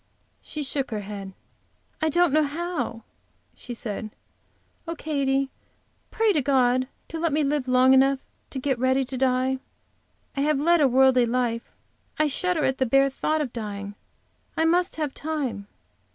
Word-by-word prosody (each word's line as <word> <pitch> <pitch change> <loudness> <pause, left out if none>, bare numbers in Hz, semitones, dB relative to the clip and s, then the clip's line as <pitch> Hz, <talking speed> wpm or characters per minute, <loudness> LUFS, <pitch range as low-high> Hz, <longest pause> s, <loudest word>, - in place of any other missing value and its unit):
She 300 - -4
shook 275 0 -1
her 215 -3 -3
head. 200 -1 -7 0.7
"I 315 - +2
don't 345 -1 +3
know 310 - +5
how," 295 -6 -3 0.5
she 245 - -8
said. 215 -1 -5 0.8
"Oh, 335 - -3
Katy, 275 -3 0 0.6
pray 445 -2 +2
to 305 - +2
God 255 -1 +2 0.2
to 325 - -5
let 335 -1 +1
me 300 +1 +2
live 280 -2 0
long 255 +1 +5
enough 270 +1 +5 0.3
to - - -6
get 265 -1 -1
ready 260 +1 +2
to 260 - -5
die. 260 0 +1 0.8
I 275 - -1
have 300 -1 +2
led 340 +2 +4
a 280 - +6
worldly 260 -1 +4
life. 235 -1 -1 0.5
I 310 - +3
shudder 320 +2 0
at 265 0 0
the 260 - +2
bare 275 +3 +4
thought 310 +3 0
of 260 -5 -4
dying; 205 -3 -5 0.6
I 320 - +3
must 350 +3 +2
have 300 -4 -2
time." 285 -10 -3
270 Hz, 165 wpm, -25 LUFS, 250-305 Hz, 0.8 s, a